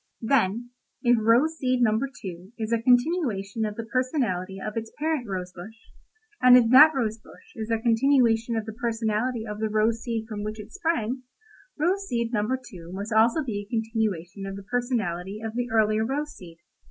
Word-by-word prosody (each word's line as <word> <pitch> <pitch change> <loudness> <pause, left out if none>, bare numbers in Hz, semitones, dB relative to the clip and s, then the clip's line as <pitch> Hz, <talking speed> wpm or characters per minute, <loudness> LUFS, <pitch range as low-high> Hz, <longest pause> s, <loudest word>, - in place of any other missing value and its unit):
"Then, 235 -1 +1 0.3
if 245 -1 +5
rose 255 +9 +3
seed 255 -1 +1
number 225 +4 +2
two 185 +2 -8
is 220 -1 -4
a 230 - +1
continuation 245 - +1
of 210 -1 -4
the 230 - -5
personality 225 - -1
of 210 +2 -5
its 225 -1 -4
parent 305 -5 -1
rose 180 -2 -4
bush, 190 +5 -10 0.7
and 250 0 +8
if 235 -2 +3
that 300 +4 +8
rose 225 -4 -1
bush - - -18
is 220 0 -5
a 225 - +2
continuation 235 0 +2
of 220 -1 -2
the 220 - -6
personality 225 0 -1
of 210 -1 -6
the 220 0 -1
rose 220 +2 +1
seed 230 -2 -3
from 210 -2 -5
which 215 +1 -5
it 210 - -10
sprang, 270 - -1 0.6
rose 375 +6 0
seed 235 -3 -2
number 215 +4 0
two 185 -10 -12
must 200 +4 -5
also 230 +8 +4
be 215 -6 -3
a 200 - -19
continuation 215 -5 -2
of 195 - -5
the 200 - -8
personality 210 -5 -2
of 220 0 -5
the 245 +1 -2
earlier 220 -1 +2
rose 295 +5 -3
seed. 170 -3 -13
225 Hz, 190 wpm, -26 LUFS, 210-250 Hz, 0.7 s, and